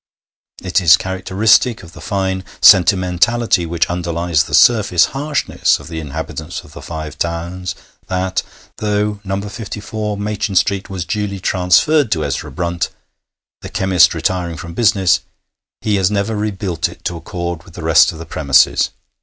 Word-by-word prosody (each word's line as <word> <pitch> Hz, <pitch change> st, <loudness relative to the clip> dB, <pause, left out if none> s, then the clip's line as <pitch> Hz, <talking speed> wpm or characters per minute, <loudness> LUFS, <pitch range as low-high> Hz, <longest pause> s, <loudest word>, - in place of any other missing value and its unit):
It 95 Hz, +1 st, +1 dB
is 80 Hz, -4 st, +7 dB
characteristic 95 Hz, +5 st, +1 dB
of 85 Hz, -1 st, -13 dB
the -, -, -12 dB
fine 95 Hz, -2 st, -2 dB, 0.2 s
sentimentality 95 Hz, +1 st, +4 dB
which 85 Hz, -1 st, 0 dB
underlies 85 Hz, -1 st, -1 dB
the -, -, -1 dB
surface 105 Hz, -8 st, +5 dB
harshness 140 Hz, +1 st, 0 dB
of -, -, -12 dB
the 80 Hz, -1 st, -5 dB
inhabitants 80 Hz, +1 st, -6 dB
of -, -, -16 dB
the -, -, -10 dB
Five 80 Hz, -2 st, -7 dB
Towns 85 Hz, +2 st, -3 dB, 0.3 s
that, 95 Hz, 0 st, -1 dB, 0.4 s
though 105 Hz, 0 st, -1 dB
No. 95 Hz, 0 st, -2 dB
54 105 Hz, +1 st, -5 dB
Machin 105 Hz, -1 st, -3 dB
Street 95 Hz, +2 st, +1 dB
was 95 Hz, -3 st, -4 dB
duly 100 Hz, +2 st, -3 dB
transferred 95 Hz, -, +2 dB
to 80 Hz, -3 st, -2 dB
Ezra 70 Hz, +2 st, -3 dB
Brunt, 85 Hz, +3 st, -2 dB, 0.7 s
the -, -, -8 dB
chemist 95 Hz, -2 st, +3 dB
retiring 85 Hz, 0 st, -2 dB
from 85 Hz, 0 st, -8 dB
business, 95 Hz, -4 st, +3 dB, 0.6 s
he 105 Hz, -2 st, +1 dB
has 95 Hz, -1 st, +2 dB
never 105 Hz, +1 st, -1 dB
rebuilt 100 Hz, -5 st, -2 dB
it -, -, -15 dB
to 85 Hz, -, -2 dB
accord 85 Hz, 0 st, -5 dB
with 85 Hz, +1 st, -17 dB
the 90 Hz, -, -8 dB
rest 80 Hz, +1 st, +5 dB
of 80 Hz, -, -10 dB
his 80 Hz, 0 st, -9 dB
premises. 70 Hz, -4 st, +3 dB
90 Hz, 155 wpm, -17 LUFS, 85-105 Hz, 0.7 s, is